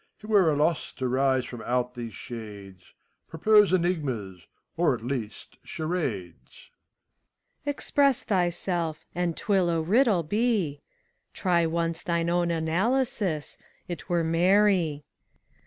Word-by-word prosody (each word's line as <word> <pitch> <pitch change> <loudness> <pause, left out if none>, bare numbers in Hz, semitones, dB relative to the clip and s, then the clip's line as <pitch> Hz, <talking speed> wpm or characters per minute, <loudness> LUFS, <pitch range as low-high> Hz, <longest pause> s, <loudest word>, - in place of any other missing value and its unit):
It 215 - -13
were 205 -6 +4
a - - +1
loss 155 +2 0
to 130 - -3
rise 130 0 +1
from 120 -2 -8
out 125 0 -1
these 120 -4 -7
shades: 100 -5 -9 0.2
— - - -48
Propose 210 +5 +4
enigmas, 135 - -1 0.3
or - - +2
at 115 - -9
least 120 -5 -5
charades! 110 - -5
SPHINX. - - -32
Express 280 -2 +2
thyself, 175 -4 -1
and 175 -2 -2
't - - -7
will 190 -4 +3
a 165 -1 +1
riddle 200 +2 +3
be. 200 -5 0 0.5
Try 170 -3 +2
once 165 0 -1
thine 170 -2 -1
own 175 0 +1
analysis: 175 - -1 0.3
't 175 - -6
were 170 -1 +1
merry. 175 -2 +2
165 Hz, 130 wpm, -26 LUFS, 130-185 Hz, 0.5 s, were